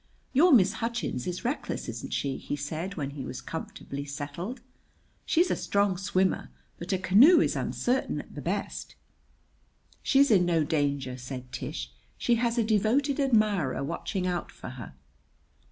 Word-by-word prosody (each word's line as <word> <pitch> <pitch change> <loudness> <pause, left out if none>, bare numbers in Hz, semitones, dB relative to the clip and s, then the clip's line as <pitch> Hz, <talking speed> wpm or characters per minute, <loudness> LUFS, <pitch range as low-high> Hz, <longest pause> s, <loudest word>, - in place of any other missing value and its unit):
"Your 330 +7 +6
Miss 205 -7 +6
Hutchins 230 - -2
is 180 +6 -4
reckless, 260 +5 -2
isn't - - -6
she?" 135 -2 -1
he - - -4
said 160 +7 -4
when 140 -4 -3
he 140 -1 -6
was 125 - -6
comfortably 140 -3 -6
settled. 145 - -5 0.7
"She's 345 +2 +3
a - - +2
strong 200 -1 +1
swimmer; 190 0 0 0.3
but 175 +3 -5
a 190 - +2
canoe 215 - +7
is - - +2
uncertain 255 +2 -1
at - - -10
the - - -6
best." - - -3 1.1
"She's 275 -1 +4
in 190 -4 +6
no 170 -3 +2
danger," 140 -4 -1
said 125 0 -7
Tish. - - -5 0.3
"She 240 - +2
has 235 0 +1
a 235 - +3
devoted 230 +7 +2
admirer 215 - +2
watching 180 +5 -3
out 180 -1 -2
for - - -9
her." 125 - -9
185 Hz, 155 wpm, -28 LUFS, 145-235 Hz, 1.1 s, canoe